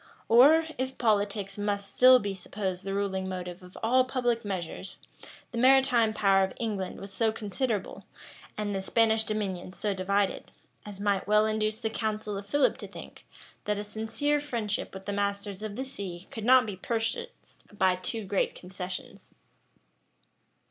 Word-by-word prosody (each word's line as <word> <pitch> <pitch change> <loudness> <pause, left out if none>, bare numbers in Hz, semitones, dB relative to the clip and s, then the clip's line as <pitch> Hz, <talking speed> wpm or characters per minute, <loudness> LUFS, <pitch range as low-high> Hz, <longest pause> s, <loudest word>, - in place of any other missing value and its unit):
Or, 290 +8 +7
if 260 0 -3
politics 205 -3 0
must 200 -1 -2
still 255 0 +8
be 205 -4 -3
supposed 190 -1 -4
the 195 0 -3
ruling 190 -1 -1
motive 180 -1 -6
of 180 0 -13
all 255 +3 +4
public 245 -2 0
measures, 185 -5 -5 0.5
the 235 - -3
maritime 255 -3 +5
power 195 -2 +3
of 190 - -2
England 205 -5 -3
was 195 0 -8
so 225 +2 +2
considerable, 215 0 -3 0.5
and 210 -1 -2
the 195 - -1
Spanish 220 +2 +3
dominions 195 -4 -3
so 210 -2 0
divided, 195 +1 0 0.4
as 200 -2 -8
might 200 -2 0
well 210 +1 +5
induce 215 0 0
the 220 -1 -1
council 215 -2 -2
of 200 0 -6
Philip 285 +6 +2
to - - -7
think, - - -12 0.4
that 210 0 0
a 205 - -3
sincere 225 +8 -1
friendship 235 -8 -3
with 190 0 -9
the 205 - -2
masters 200 0 -2
of 215 -1 -5
the 265 - -3
sea 195 -9 -7
could 220 -2 -5
not 255 0 +7
be 205 -3 -5
purchased 230 - -4
by 190 -3 +2
too 205 +4 -5
great 195 0 0
concessions. 180 0 -7
210 Hz, 160 wpm, -28 LUFS, 195-230 Hz, 0.5 s, still